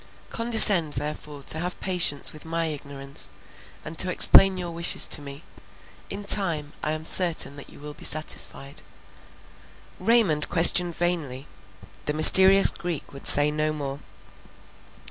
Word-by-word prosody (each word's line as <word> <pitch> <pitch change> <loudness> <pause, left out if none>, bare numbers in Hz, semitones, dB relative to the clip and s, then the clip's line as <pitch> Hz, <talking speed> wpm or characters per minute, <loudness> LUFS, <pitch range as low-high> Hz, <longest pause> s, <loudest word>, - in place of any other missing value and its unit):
Condescend 215 -9 +4
therefore 150 -1 -9
to 160 - +1
have 180 +2 -8
patience 175 -6 -2
with 155 - -15
my 165 +1 -5
ignorance, 140 -3 -6 0.5
and 160 +1 -11
to 185 - +3
explain 190 +1 +4
your 175 -1 -8
wishes 170 0 +2
to - - -3
me; 140 +1 -11 0.7
in 200 +1 -9
time 165 -8 -3
I 155 - -5
am 155 0 -9
certain 170 -5 +3
that 145 - -13
you - - -18
will 150 0 -12
be - - -17
satisfied." 150 -2 -1 1.2
Raymond 215 -10 -1
questioned 175 0 +2
vainly; 160 -7 -6 0.6
the 150 - -3
mysterious 190 +5 +6
Greek 175 -5 -9
would 140 - -2
say 145 +1 +5
no 155 0 -4
more. 140 -2 -9
155 Hz, 140 wpm, -21 LUFS, 145-180 Hz, 1.2 s, mysterious